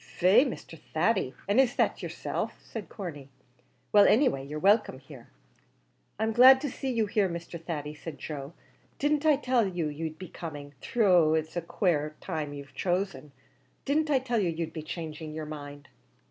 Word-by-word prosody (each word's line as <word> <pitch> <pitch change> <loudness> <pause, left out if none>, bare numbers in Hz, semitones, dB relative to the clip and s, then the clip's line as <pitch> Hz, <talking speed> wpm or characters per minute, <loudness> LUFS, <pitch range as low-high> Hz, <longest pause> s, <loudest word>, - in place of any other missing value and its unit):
"Faix, 215 +10 +4
Mr. 165 -8 -9 0.2
Thady, 175 - +1
and 205 +5 +3
is 265 0 +3
that - - +1
yerself?" - - -4
said 225 -4 -8
Corney; 150 -9 -7 0.6
"well, 205 -1 +7
anyway 220 - +3
you're 145 +2 -6
welcome 200 -2 +3
here." 130 -3 -13 0.9
"I'm 220 +2 0
glad 255 +3 +8
to 290 -3 -3
see 270 - -4
you 230 -3 +1
here, 205 -2 +1
Mr. 170 -1 -7
Thady," 150 -3 -4
said 150 0 -8
Joe; 140 +2 -6 0.4
"didn't 295 +1 +1
I 305 - +6
tell 250 -5 +1
you 175 -4 -2
you'd 155 +1 -5
be 185 0 -9
coming? 145 -4 -8 0.2
though 180 -8 +5
it's 160 +1 -2
a 175 - 0
quare 155 -3 0
time 155 -5 -4
you've 140 -1 -9
chosen. 180 -4 -2 0.5
Didn't 300 +2 +1
I 285 - +4
tell 250 -3 0
you 185 -4 +1
you'd 165 -1 -4
be 160 - -5
changing 155 -1 -6
your 155 -1 -4
mind?" 145 -1 -8
170 Hz, 175 wpm, -28 LUFS, 150-220 Hz, 0.9 s, glad